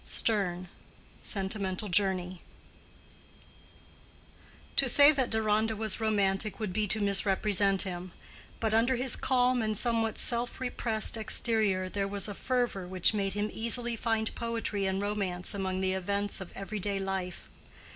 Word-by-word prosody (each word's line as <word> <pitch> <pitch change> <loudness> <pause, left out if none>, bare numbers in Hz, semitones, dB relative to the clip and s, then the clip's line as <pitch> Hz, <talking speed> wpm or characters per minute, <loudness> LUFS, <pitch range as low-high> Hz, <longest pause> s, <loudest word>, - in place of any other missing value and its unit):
—STERNE: 185 -5 0 0.5
Sentimental 195 0 -1
Journey. 185 -2 +1 2.3
To 270 -2 +4
say 285 +4 +8
that 270 -4 -1
Deronda 220 0 0
was 215 -1 +1
romantic 205 -2 0
would 210 -4 -4
be 210 +1 0
to 215 - +1
misrepresent 200 -1 +3
him; 180 -1 -6 0.5
but 220 -1 -1
under 235 +4 +2
his 250 0 +4
calm 250 -1 +1
and 215 -1 -1
somewhat 225 -1 0
self 240 0 +1
repressed 230 -3 -1
exterior 215 -4 +1
there 195 +1 -3
was 200 0 0
a 205 - -5
fervor 240 -5 -2
which 185 +2 +2
made 195 -2 -2
him 205 +1 -2
easily 235 +1 -1
find 225 -1 -1
poetry 225 -4 -3
and 190 +1 -2
romance 195 -4 -2
among 190 -1 -3
the 190 0 0
events 200 +2 -2
of 190 - -8
everyday 200 0 -3
life. 190 -2 -4
205 Hz, 135 wpm, -29 LUFS, 190-225 Hz, 2.3 s, say